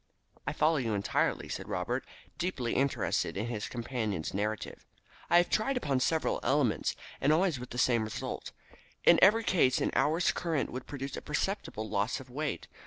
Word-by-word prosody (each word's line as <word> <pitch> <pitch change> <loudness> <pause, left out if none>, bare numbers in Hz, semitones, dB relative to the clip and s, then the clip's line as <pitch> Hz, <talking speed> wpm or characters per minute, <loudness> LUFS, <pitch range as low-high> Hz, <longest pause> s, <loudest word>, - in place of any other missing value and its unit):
"I - - 0
follow 155 +1 +3
you 115 -6 0
entirely," 100 - 0
said - - -5
Robert, - - -1 0.4
deeply 135 -10 -1
interested 135 -6 0
in 105 - -1
his 115 -3 -3
companion's 115 -8 -3
narrative. 105 +2 -3 0.5
"I 175 0 +6
tried 250 +8 0
upon 140 - 0
several 160 +4 +1
elements, 130 -3 +1 0.3
and 140 - +4
always 165 -3 +2
with 125 - -8
the 125 - -7
same 120 -2 +3
result. 110 - -5 0.5
In - - +7
every 220 +4 +6
case 130 -11 +3
an - - 0
hour's 160 +4 +3
current 165 -5 -1
would 130 0 -6
produce 135 -1 -5
a - - -5
perceptible 150 - -2
loss 105 +3 0
of 130 -1 -12
weight. 145 +3 -3
130 Hz, 170 wpm, -31 LUFS, 115-160 Hz, 0.5 s, In